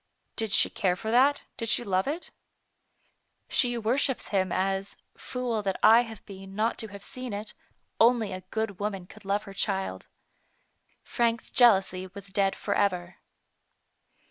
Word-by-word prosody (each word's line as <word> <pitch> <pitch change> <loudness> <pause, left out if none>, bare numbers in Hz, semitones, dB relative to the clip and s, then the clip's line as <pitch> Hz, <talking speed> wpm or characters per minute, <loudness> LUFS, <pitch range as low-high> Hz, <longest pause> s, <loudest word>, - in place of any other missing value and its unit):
Did 220 -2 -1
she - - +4
care 185 -4 +1
for 220 +4 -4
that, 270 +4 +4
did 230 - -3
she 240 - +3
love 190 -1 0
it? 315 +5 -4 0.4
" - - -46
" - - -48 0.3
She 245 -2 +3
worships 250 +4 0
him 190 -3 +1
as 195 +1 -1 0.2
(fool 245 -3 -3
that 195 -2 -2
I 225 +2 +8
have 225 -4 -9
been 195 -1 -10
not 220 +3 0
to 220 - -1
have 200 -1 -11
seen 255 -1 -6
it) 210 +1 -6 0.5
only 230 -4 +4
a 185 - -6
good 220 -3 -3
woman 200 -3 -3
could 215 +2 -16
love 200 +2 0
her 195 - -10
child." 190 - -2 1.0
Frank's 230 -1 -1
jealousy 190 -6 +4
was 200 -1 -8
dead 195 0 +2
forever. 185 -3 -1
205 Hz, 160 wpm, -28 LUFS, 195-230 Hz, 1.0 s, I